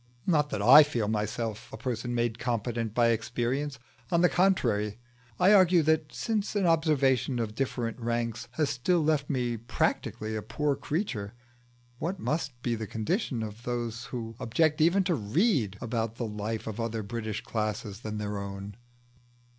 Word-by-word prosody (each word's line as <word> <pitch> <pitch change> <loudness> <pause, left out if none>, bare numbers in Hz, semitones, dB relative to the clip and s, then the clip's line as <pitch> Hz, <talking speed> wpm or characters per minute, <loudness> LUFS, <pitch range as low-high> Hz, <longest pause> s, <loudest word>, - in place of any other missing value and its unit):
Not 150 -5 +2
that 100 - -2
I 135 +7 +10
feel 120 -8 0
myself 110 +1 -3
a - - -7
person 120 0 -3
made 120 -1 0
competent 115 -2 -2
by 120 -1 +4
experience; 120 +5 -1 0.3
on 170 - +3
the 180 - +5
contrary, 115 - +2 0.4
I 195 +3 +6
argue 180 -4 +6
that 155 -1 +1
since 215 -3 -2
an 200 -2 +2
observation 145 -6 +2
of 115 -3 -2
different 120 -1 -2
ranks 115 0 -2
has 150 -1 +1
still 155 +6 +1
left 150 -2 +1
me 125 -4 0
practically 110 -1 -1
a 110 - -2
poor 150 +5 -1
creature, 130 - -3 0.6
what 175 +5 -2
must 135 -1 -2
be 120 - 0
the 110 -1 -3
condition 120 - -1
of 110 +1 -7
those 120 -1 -3
who 115 -2 -6
object 155 +6 +1
even 175 +5 +4
to 180 -1 +1
read 120 - +1
about 115 -1 -2
the 120 - -3
life 105 +1 -4
of 110 0 -5
other 115 -1 -2
British 110 0 -4
classes 105 -2 -3
than 110 -2 -5
their 105 -1 -3
own? 100 +1 -7
120 Hz, 160 wpm, -29 LUFS, 110-150 Hz, 0.6 s, I